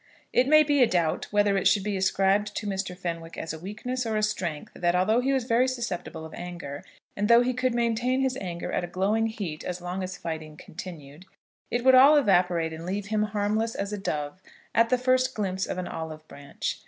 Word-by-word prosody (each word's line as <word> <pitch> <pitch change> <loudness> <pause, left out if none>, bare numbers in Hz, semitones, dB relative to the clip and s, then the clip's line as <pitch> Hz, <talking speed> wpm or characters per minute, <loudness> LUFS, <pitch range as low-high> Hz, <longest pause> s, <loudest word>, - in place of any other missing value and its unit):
It 255 - +4
may 310 +1 +7
be 290 -2 +2
a 245 - +7
doubt 170 -5 0
whether 205 -1 +2
it 190 - +2
should 195 0 +3
be 205 0 -2
ascribed 195 +2 +1
to 210 - -4
Mr. 190 -2 -3
Fenwick 165 -2 -5
as 160 - -4
a 160 - -7
weakness 220 +8 -4
or 220 -2 -1
a 215 - 0
strength 175 -7 -2
that, 175 -1 0
though 220 +4 +3
he 265 +2 +1
was 265 -2 +1
very 240 +2 +2
susceptible 230 -10 -4
of 160 - -11
anger, 175 -5 -7 0.3
and 205 +1 0
though 235 +1 +7
he 255 +1 0
could 255 -1 0
maintain 240 +2 +1
his 265 -1 0
anger 175 -6 -5
at 175 -1 -2
glowing 210 +5 +1
heat 195 -9 -5
as 180 0 -4
long 180 +2 -4
as 185 -1 -5
fighting 155 -2 -6
continued, 160 -1 -10 0.4
it 240 0 -1
would 260 0 +6
all 275 +4 +8
evaporate 180 - +2
and 160 +1 -7
leave 195 +3 -4
him 215 -1 +1
harmless 215 +2 -1
as 200 +1 -3
a - - -2
dove 150 -1 -3 0.3
at 230 0 +4
the 255 - +3
first 255 +1 +2
glimpse 190 -2 -2
of - - -4
an 180 - -3
olive 155 -1 -7
branch. 140 0 -5
200 Hz, 215 wpm, -27 LUFS, 175-235 Hz, 0.4 s, all